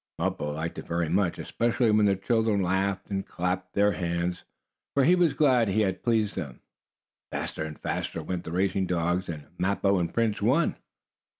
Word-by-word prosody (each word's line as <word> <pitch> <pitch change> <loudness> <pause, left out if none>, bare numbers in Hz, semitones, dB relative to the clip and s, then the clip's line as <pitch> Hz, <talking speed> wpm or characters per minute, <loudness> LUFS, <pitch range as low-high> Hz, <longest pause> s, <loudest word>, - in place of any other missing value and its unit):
Mappo 75 0 -2
liked 80 +2 -4
it - - -9
very 85 -1 -1
much, 90 0 +1
especially 120 0 +1
when 105 -1 +4
the 100 - +3
children 110 0 +1
laughed 95 +2 -1
and 95 0 -1
clapped 90 0 -3
their 105 +1 +4
hands, 85 0 -2 0.5
for 140 - +4
he 170 - +5
was 175 -5 +3
glad 130 -6 +3
he 100 +3 +2
had 95 -3 0
pleased 110 -3 +1
them. 70 -10 -5 0.7
Faster - - -3
and 75 -1 -6
faster - - -3
went 90 -2 -3
the 80 - -7
racing 95 +1 +1
dogs, 90 +1 0
and 75 -3 -6
Mappo 100 0 +2
and 85 -1 -1
Prince 115 -3 0
won. 130 +10 +2
95 Hz, 180 wpm, -27 LUFS, 85-110 Hz, 0.7 s, he